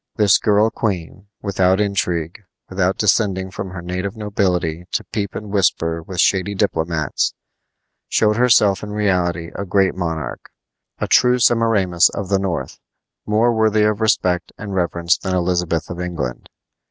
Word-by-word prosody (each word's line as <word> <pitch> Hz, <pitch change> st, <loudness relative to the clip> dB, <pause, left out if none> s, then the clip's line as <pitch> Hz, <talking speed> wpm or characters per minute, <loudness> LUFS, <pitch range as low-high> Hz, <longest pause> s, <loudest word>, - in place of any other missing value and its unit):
This 105 Hz, -3 st, +4 dB
girl 105 Hz, +1 st, +3 dB
queen, 95 Hz, -3 st, -4 dB, 0.2 s
without 95 Hz, -1 st, +2 dB
intrigue, 90 Hz, -5 st, -1 dB, 0.3 s
without 95 Hz, 0 st, 0 dB
descending 95 Hz, -3 st, +1 dB
from 95 Hz, +1 st, -6 dB
her 90 Hz, -1 st, -8 dB
native 90 Hz, +4 st, -4 dB
nobility 90 Hz, -6 st, -1 dB
to -, -, 0 dB
peep 100 Hz, -3 st, -4 dB
and 105 Hz, -2 st, -6 dB
whisper 85 Hz, -4 st, +1 dB
with 90 Hz, +2 st, -8 dB
shady 100 Hz, +1 st, +2 dB
diplomats, 80 Hz, -5 st, -1 dB, 0.7 s
showed 105 Hz, -1 st, +2 dB
herself 110 Hz, -5 st, +4 dB
in 105 Hz, -, -7 dB
reality 90 Hz, -5 st, 0 dB
a -, -, -4 dB
great 95 Hz, 0 st, +2 dB
monarch, 80 Hz, -7 st, -4 dB, 0.5 s
a -, -, -2 dB
true 125 Hz, 0 st, +4 dB
Semiramis 110 Hz, -7 st, +3 dB
of 100 Hz, -2 st, -4 dB
the 100 Hz, -1 st, +2 dB
north, 95 Hz, -3 st, -3 dB, 0.5 s
more 110 Hz, +3 st, +2 dB
worthy 110 Hz, -1 st, +2 dB
of 105 Hz, 0 st, +1 dB
respect 90 Hz, -5 st, +1 dB
and 105 Hz, -2 st, -7 dB
reverence 85 Hz, -1 st, 0 dB
than 95 Hz, -1 st, -2 dB
Elizabeth 90 Hz, -2 st, 0 dB
of 85 Hz, -, -6 dB
England. 85 Hz, -9 st, -5 dB
95 Hz, 145 wpm, -19 LUFS, 90-105 Hz, 0.7 s, This